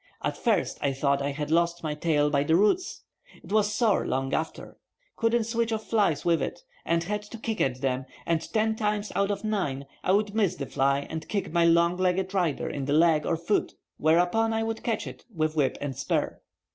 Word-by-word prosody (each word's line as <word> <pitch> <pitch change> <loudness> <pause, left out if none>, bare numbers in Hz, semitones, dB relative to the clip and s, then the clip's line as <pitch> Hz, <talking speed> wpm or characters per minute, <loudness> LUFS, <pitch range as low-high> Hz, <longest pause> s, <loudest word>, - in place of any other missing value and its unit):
At - - -1
first - - 0
I 140 -1 +1
thought 140 +1 +1
I 140 - -1
had 150 +1 -4
lost 170 +1 +1
my 155 -2 -1
tail 150 -1 +1
by 140 -1 +2
the 160 +2 +3
roots. 210 - +1 0.4
It - - -12
was 210 0 +3
sore 215 -1 +2
long 135 0 -1
after. 160 - -3 0.4
Couldn't 230 0 +2
switch 230 0 -1
off 220 -1 -2
flies 200 -10 +1
with 170 -1 +3
it, - - -4 0.2
and 170 0 +1
had 210 +4 -2
to 210 +2 -10
kick 225 -1 -3
at 130 -1 0
them, 130 -1 -1 0.2
and 165 -1 +1
ten 220 0 +1
times 210 -1 -1
out 200 0 +1
of 205 - -2
nine 180 -11 -1 0.2
I'd 205 +2 +2
miss 200 -5 +1
the 140 - -4
fly 140 +1 +1
and 160 0 -6
kick 200 -6 -2
my 170 -1 +4
long 170 +1 +4
legged 185 +1 0
rider 175 -7 0
in 140 -2 -3
the 145 - 0
leg 160 -1 +4
or 165 - +1
foot, 170 +5 -1 0.2
whereupon 180 +8 +3
I 225 0 0
would 225 0 -3
catch 230 -2 -1
it - - -9
with 155 -1 0
whip 145 -4 +1
and 140 -2 -4
spur. - - -2
170 Hz, 210 wpm, -27 LUFS, 150-210 Hz, 0.4 s, my